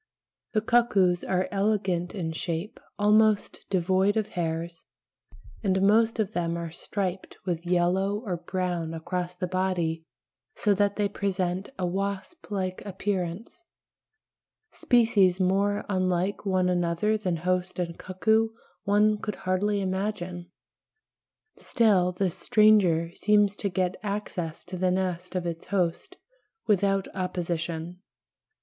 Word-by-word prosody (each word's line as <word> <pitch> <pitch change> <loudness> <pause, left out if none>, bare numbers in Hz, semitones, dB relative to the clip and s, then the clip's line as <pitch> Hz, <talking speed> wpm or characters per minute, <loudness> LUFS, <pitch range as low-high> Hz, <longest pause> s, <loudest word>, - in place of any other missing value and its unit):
The 215 - +2
cuckoos 205 -6 +3
are 185 0 0
elegant 195 -3 0
in 165 -5 -2
shape, 170 +4 -4 0.2
almost 210 0 +3
devoid 190 +3 +2
of 215 - 0
hairs, 165 0 -3 0.8
and 190 -2 +2
most 225 +3 +4
of 215 -2 0
them 170 -1 -1
are 170 -1 -5
striped 185 +1 -4
with 175 -2 -3
yellow 180 +3 +2
or 180 -4 -2
brown 175 -2 -3
across 180 +2 -3
the 180 +1 -2
body 175 -3 -1 0.5
so 210 - +2
that 200 0 +1
they 205 -1 +1
present 190 -1 -2
a 185 - -1
wasp 195 - -4
like 185 -3 -2
appearance 195 - -4 1.1
(pl. - - -18
B, 245 -1 +7
18). 225 - +2
Species 185 -3 +4
more 200 +2 +1
unlike 185 +1 0
one 185 -1 +2
another 175 +4 +1
than 185 -5 -1
host 180 +2 -1
and 170 -2 -3
cuckoo 220 +4 +1 0.3
one 210 +1 +3
could 210 -1 -4
hardly 200 +2 0
imagine; 185 -2 -3 1.1
still 200 -7 +3
this 180 -1 -1
stranger 190 -6 +4
seems 205 -1 +3
to 200 - -1
get 185 0 -1
access 200 -5 -4
to 185 +1 -6
the 185 0 +2
nest 180 -1 -2
of 180 -1 -1
its 165 -1 -5
host 180 -4 -1 0.5
without 195 -2 +2
opposition. 175 -2 -3
185 Hz, 130 wpm, -27 LUFS, 175-205 Hz, 1.1 s, B